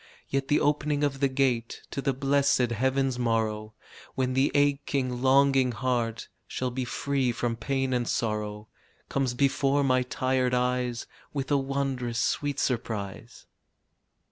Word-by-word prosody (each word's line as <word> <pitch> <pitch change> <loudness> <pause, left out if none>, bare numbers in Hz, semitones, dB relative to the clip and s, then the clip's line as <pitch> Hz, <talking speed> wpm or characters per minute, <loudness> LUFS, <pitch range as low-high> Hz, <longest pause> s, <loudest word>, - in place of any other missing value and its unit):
Yet 135 0 -1
the 145 - +3
opening 145 0 +1
of 140 -2 0
the 140 - +3
gate 130 -4 0
To 140 - -3
the 135 +1 +1
blessed 135 -2 +2
heaven's 130 +2 0
morrow, 110 -2 -1 0.4
When 130 -1 0
the 135 +2 +2
aching, 140 -3 +1
longing 135 -1 +4
heart 120 -1 -1 0.2
Shall 130 -1 -3
be 130 +1 -3
free 135 0 0
from 120 0 -2
pain 135 +3 -1
and 120 -1 0
sorrow, 105 -1 -2 0.4
Comes 135 -3 0
before 140 +1 +2
my 130 -1 +3
tired 130 0 0
eyes 125 -1 0 0.3
With 140 -1 -3
a 145 - +5
wondrous 135 -3 -2
sweet 145 +3 0
surprise. 110 -2 -3
130 Hz, 140 wpm, -27 LUFS, 120-140 Hz, 0.4 s, a